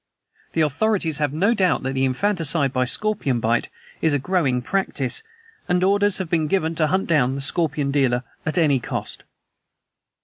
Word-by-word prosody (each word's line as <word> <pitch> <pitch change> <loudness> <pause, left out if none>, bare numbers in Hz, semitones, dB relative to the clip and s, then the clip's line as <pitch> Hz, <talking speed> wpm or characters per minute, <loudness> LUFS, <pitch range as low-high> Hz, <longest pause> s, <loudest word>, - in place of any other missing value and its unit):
"The 165 - +1
authorities 160 +1 0
have 150 -2 0
no 190 +10 +2
doubt 185 - +1
that 135 +1 -3
infanticide 140 +1 +1
by 130 -1 +1
scorpion 145 - 0
bite 115 +1 0 0.3
is 160 -3 +2
a - - +3
growing 140 -6 0
practice, 145 -7 -1 0.5
and 180 0 +2
orders 205 +1 +3
have 190 - -3
been 160 -2 0
given 160 -1 0
to 155 -1 +1
hunt 190 +5 0
down 135 -5 +2
the - - -4
scorpion 145 -1 0
dealer 130 -3 +1 0.2
at 155 - -3
any 150 -6 +3
cost." - - -6
155 Hz, 165 wpm, -22 LUFS, 135-185 Hz, 0.5 s, a